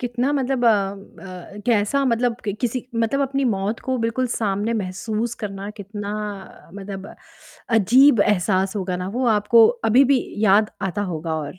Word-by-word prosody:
कितना 245 +2 -1
मतलब 265 -3 0
अ - - +6
अ, 195 -2 -4
कैसा 235 +4 +2
मतलब 240 -1 +1
कि 205 - -1
किसी 245 0 -2
मतलब 230 +4 0
अपनी 275 +1 -1
मौत 195 +4 -3
को 260 - +1
बिल्कुल 250 +3 0
सामने 210 +1 -1
महसूस 215 +5 -3
करना 200 0 -5
कितना 205 +1 -6 0.6
मतलब 195 0 -8 0.6
अजीब 245 +3 +5
एहसास 190 -1 +1
होगा 185 -2 -2
ना 180 +1 -4
वो 260 - 0
आपको 220 +2 +5 0.2
अभी 255 +5 +6
भी 260 - +2 0.2
याद 210 +2 +4 0.2
आता 205 +3 -3
होगा 160 0 -3
और 155 +3 -6
210 Hz, 155 wpm, -22 LUFS, 195-240 Hz, 0.6 s, अ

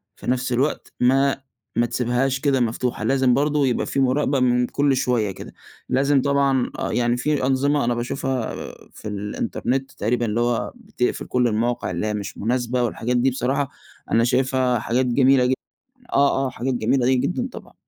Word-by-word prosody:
في - - -11
نَفس 125 +1 0
الوقت 135 +5 -1
ما 135 +2 +3 0.3
ما 120 - +3
تسيبهاش 125 +3 0
كده 135 -1 +1
مفتوحة، 120 +1 -1
لازم 130 -2 +3
برضو 145 +1 +2
يبقى 125 -2 0
في 140 - -2
مراقبة 135 +1 +2
من 125 -1 +2
كُلّ 140 -1 +1
شويّة 120 -5 0
كده. - - -10 0.4
لازم 140 +1 +3
طبعًا 140 -2 +1
آه، - - -2
يعني 120 0 +1
في 145 0 0
أنظمة 140 +1 +2
أنا 120 - +1
باشوفها 125 0 -2 0.4
في 105 - -9
الإنترنت 110 +6 -3
تقريبًا 120 +3 -1
اللي 110 +1 -1
هو 120 -1 0
بتقفل 220 - -3
كُلّ 125 -1 +1
المواقع 115 -1 -1
اللي 90 +4 -2
هي 105 - -1
مش 105 -1 -5
مناسبة، 125 +2 0
والحاجات 120 +1 -1
دي 125 +2 +3
بصراحة 135 +2 -1 0.4
أنا 115 - +4
شايفها 130 0 +1
حاجات 120 +4 0
جميلة 130 +1 +4
جد 130 - +2 0.6
آه، 135 -1 +3
آه، - - -3
حاجات 130 +2 -3
جميلة 130 +1 +2
جدًا 180 - -1
طبعًا. - - -11
125 Hz, 170 wpm, -22 LUFS, 120-135 Hz, 0.6 s, أنا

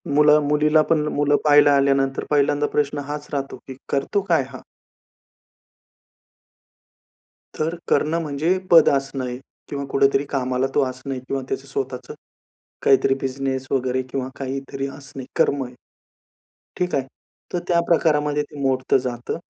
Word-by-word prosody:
मुला 150 0 +6
मुलीला 150 +1 +3
पण 150 -2 +2
मुलं 145 0 +2
पाहायला 145 -1 +6
आल्यानंतर 135 -1 +2
पहिल्यांदा 145 0 +2
प्रश्न 145 0 +1
हाच 150 0 -5
राहतो, 140 -1 -3
की 130 - -7 0.2
करतो 140 +9 0
काय 165 -5 +4
हा? 130 -2 -9 3.0
तर 160 +2 -1
करणं 160 +2 +2
म्हणजे 155 +4 0
पद 165 -2 +8
असणं 135 -1 -1
आहे 125 0 -4 0.3
किंवा 140 -1 -4
कुठेतरी 135 0 +3
कामाला 130 -1 0
तो 145 - +3
असणं 130 +1 -5
किंवा 135 -1 -2
त्याचं 140 - -4
स्वतःच 130 -2 -4 0.8
काहीतरी 135 0 +4
बिझनेस 130 0 -2
वगैरे 130 -1 0
किंवा 130 -1 -3
काहीतरी 135 0 -4
असणे 135 -1 -9
कर्म 140 -1 +2
आहे. 125 0 -10 1.0
ठीक 180 0 0
आहे. 135 - +1 0.5
तर 175 - +1
त्या 170 -1 +3
प्रकारामध्ये 150 -3 +2
ते 145 0 -12
मोडतं 130 -1 +2
जातं. 125 0 -4
140 Hz, 135 wpm, -22 LUFS, 135-150 Hz, 3.0 s, पद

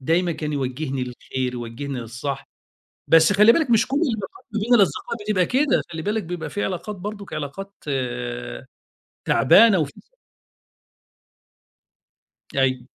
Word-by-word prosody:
دايمًا 170 +5 +1
كان 150 -1 -4
يوَجِّهني 135 0 -2
للخير، 125 +1 -4
يوَجِّهني 125 +3 -5
للصح. 125 +4 -5 0.6
بس 165 +4 +6
خلّي 210 +3 +7
بالِك 315 -5 +1
مش 230 +1 +4
كُلّ 270 - 0
العلاقات 270 - -2
ما 215 - 0
بين 240 +3 +4
الأصدقاء 230 +2 +1
بتبقى 200 -4 +2
كده، 275 +7 +2
خلّي 160 -1 -4
بالِك 210 +5 -1
بيبقى 170 -1 -5
في 205 - -1
علاقات 190 +3 -4
برضه 205 +2 -6
علاقات 155 +7 -5 1.5
تعبانة 195 - +6
وفي 145 -3 -1 2.7
أيوه. 130 -2 +1
170 Hz, 125 wpm, -23 LUFS, 135-210 Hz, 2.7 s, خلّي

